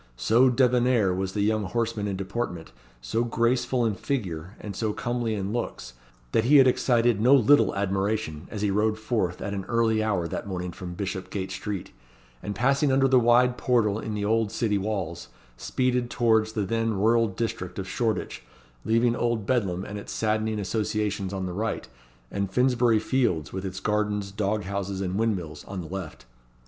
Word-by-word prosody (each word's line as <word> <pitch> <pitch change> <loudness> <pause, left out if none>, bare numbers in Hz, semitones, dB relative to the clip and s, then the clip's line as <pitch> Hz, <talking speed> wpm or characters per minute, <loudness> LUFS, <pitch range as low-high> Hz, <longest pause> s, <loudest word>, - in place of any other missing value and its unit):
So 120 - +4
débonnair 125 -5 +3
was 95 0 -2
the 105 - -1
young 110 0 +1
horseman 115 +1 -1
in 100 - -2
deportment, 95 -3 -4 0.3
so 60 - -1
graceful 120 +1 +1
in 110 - +1
figure, 95 - -4
and 100 -3 -7
so 110 0 -1
comely 120 -1 -2
in 100 0 -3
looks, 120 - -4 0.4
that 115 - +2
he 145 +4 +6
had 135 - +8
excited 120 -3 +2
no 130 +5 +6
little 140 0 +4
admiration 100 -4 -1
as 105 -2 -4
he 100 - +2
rode 105 +2 +1
forth 110 -5 -2
at 100 - -3
an 100 -1 -3
early 115 -2 +2
hour 100 -6 0
that 85 - -5
morning 90 -2 -4
from 90 0 -8
Bishopgate 95 0 -4
Street, 95 0 -5 0.5
and 105 - -4
passing 135 +5 +2
under 135 0 +4
the 130 -1 +5
wide 125 +1 +4
portal 110 -5 +2
in 110 -1 -4
the 100 -1 -2
old 110 0 +1
city 110 -3 0
walls, 95 -5 -3 0.3
speeded 125 - -1
towards 110 -3 +2
the 105 -3 -1
then 115 +2 0
rural 115 +3 +3
district 95 -3 -4
of 95 -1 -4
Shoreditch, 110 - -2 0.4
leaving 115 +1 +2
Old 120 -4 -1
Bedlam 100 -7 0
and 105 0 -6
its - - -9
saddening 110 0 0
associations 105 -1 -1
on 95 -1 -3
the 90 - -4
right, 105 - -3 0.4
and 100 -1 -2
Finsbury 125 0 +3
Fields, 105 - 0
with 95 0 -4
its 95 0 -5
gardens, 105 -1 -1
dog 105 +1 -1
houses, 100 0 -3
and 95 -2 -2
windmills, 95 -8 -2
on 95 -1 -6
the 85 - -6
left. 90 -9 -7
105 Hz, 180 wpm, -26 LUFS, 95-120 Hz, 0.5 s, had